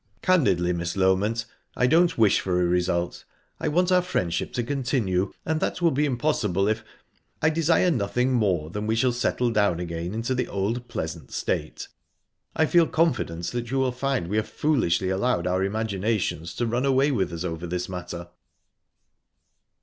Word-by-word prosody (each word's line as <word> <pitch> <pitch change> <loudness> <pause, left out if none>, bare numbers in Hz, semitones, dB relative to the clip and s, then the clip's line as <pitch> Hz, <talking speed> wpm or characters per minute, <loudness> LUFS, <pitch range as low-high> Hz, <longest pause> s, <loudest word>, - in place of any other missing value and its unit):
"Candidly, 95 - +3
Miss 85 0 -3
Loment, 100 +5 +2 0.3
I 125 - +2
don't 165 +4 +3
wish 110 -3 +4
for 90 -1 0
a 90 - +2
result. 90 0 0 0.4
I - - -2
want 180 +4 +2
our 180 0 +5
friendship 90 - -2
to 120 - -1
continue, 120 -8 0
and 160 0 0
that - - -2
will 170 -2 +3
be 145 +3 +1
impossible 115 - 0
if...I 115 +7 -4
desire 165 +2 +3
nothing 125 +1 0
more 90 -10 +1
than 105 +3 -4
that - - -4
we 110 - +1
shall 125 +2 +2
settle 120 0 0
down 100 -6 +2
again 85 +2 -4
into 115 +3 -1
the 125 0 -1
old 110 +5 -2
pleasant 80 0 -5
state. - - -3 0.7
I 160 - +3
feel 170 +1 +4
confident 155 - 0
that 120 -1 -4
you 135 - -1
will 130 -1 +2
find 130 -6 -1
we 105 +4 -1
have 110 - -1
foolishly 100 - +1
allowed 95 -1 0
our 90 +1 +1
imaginations 100 -4 -2
to 120 - -1
run 120 +2 0
away 135 +1 +3
with 100 -9 0
us 85 0 -5
over 85 -1 -4
this 90 +1 -3
matter." 85 -1 -6
110 Hz, 175 wpm, -25 LUFS, 90-135 Hz, 0.7 s, our